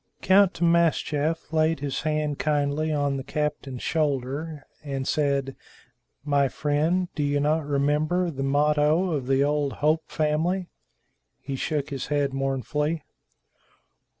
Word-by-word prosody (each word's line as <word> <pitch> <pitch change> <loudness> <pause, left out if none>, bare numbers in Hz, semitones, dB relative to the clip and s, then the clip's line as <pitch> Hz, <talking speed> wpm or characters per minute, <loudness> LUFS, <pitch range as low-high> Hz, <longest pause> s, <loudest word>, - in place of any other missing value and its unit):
Count 190 -1 +5
Timascheff 165 -2 +1
laid 160 -1 +2
his 140 -1 -3
hand 150 -1 -1
kindly 150 +1 0
on 145 -2 0
the 135 - -5
captain's 145 -4 -3
shoulder, 145 0 -2 0.2
and 135 -2 -4
said, 140 -3 0 0.7
"My 140 -2 +3
friend, 155 +7 0
do 150 - -3
you 145 0 +1
not 150 +1 +1
remember 150 +5 +1
the 135 -3 -5
motto 150 +5 +2
of 140 -5 -2
the 135 +1 +3
old 145 -1 0
Hope 155 +2 0
family?" 165 +4 0 0.7
He 135 0 -5
shook 145 +2 -2
his 135 - -4
head 145 -2 0
mournfully. 135 +3 -1
150 Hz, 125 wpm, -25 LUFS, 140-155 Hz, 0.7 s, Count